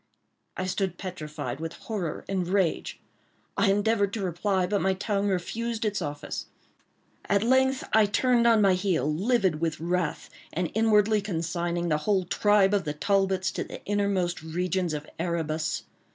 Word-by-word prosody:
I 185 - -2
stood 185 -1 -1
petrified 150 -8 -5
with 165 +1 -4
horror 195 -8 -4
and 185 -3 -1
rage. 185 -3 0 0.6
I 200 - +3
endeavored 205 0 +2
to 215 - -2
reply, 185 +1 0
but 200 +2 0
my 190 0 +2
tongue 200 +1 -1
refused 225 +5 -2
its 205 -2 -1
office. 145 -2 -5 0.8
At 200 0 +2
length 260 +2 +3
I 215 -1 +6
turned 235 +3 +3
on 225 -2 +5
my 195 -1 +5
heel, 180 -7 0
livid 190 -3 +1
with 165 -2 -1
wrath, 170 -1 -2 0.2
and 175 0 -2
inwardly 215 -1 +3
consigning 170 -2 -2
the 150 - +2
whole 190 +2 +1
tribe 205 +1 +3
of 200 -2 +2
the 150 -3 -3
Talbots 190 +3 +1
to - - -3
the - - -10
innermost 200 -4 0
regions 175 +1 -1
of 150 0 -6
Erebus. 160 -2 -1
190 Hz, 155 wpm, -27 LUFS, 170-205 Hz, 0.8 s, I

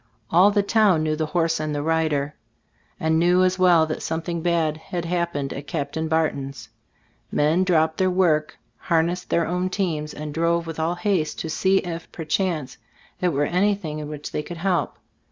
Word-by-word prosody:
All 180 +5 +6
the 205 -1 +2
town 200 -6 +3
knew 155 0 0
the 155 0 -2
horse 165 0 0
and 155 -1 -2
the 145 - -2
rider, 155 -3 0 0.7
and 160 0 +2
knew 180 +2 +4
as 185 0 +1
well 175 -3 +5
that 155 - -4
something 165 +1 -3
bad 165 -3 +1
had 170 +2 -5
happened 170 -5 -2
at 140 +1 -8
Cap 145 -5 -3
tain 160 +1 -2
Barton's. 145 -4 -2 0.6
Men 155 +5 +2
dropped 160 -3 +2
their 185 0 +3
work, 170 -5 +1 0.2
harnessed 170 +2 0
their 170 - +2
own 180 +2 -1
teams 165 -6 -2
and 150 0 -6
drove 170 +1 +1
with 165 -1 -6
all 165 +2 0
haste 175 -4 0
to 160 - -4
see 190 +4 +2
if, 170 -2 -6
per 165 - -6
chance, 155 -6 -1 0.4
it 180 - +2
were 145 -2 +1
anything 180 -3 0
in 150 - -5
which 150 -1 -7
they - - -2
could 170 +3 -8
help. 180 +1 -1
165 Hz, 190 wpm, -23 LUFS, 155-180 Hz, 0.7 s, All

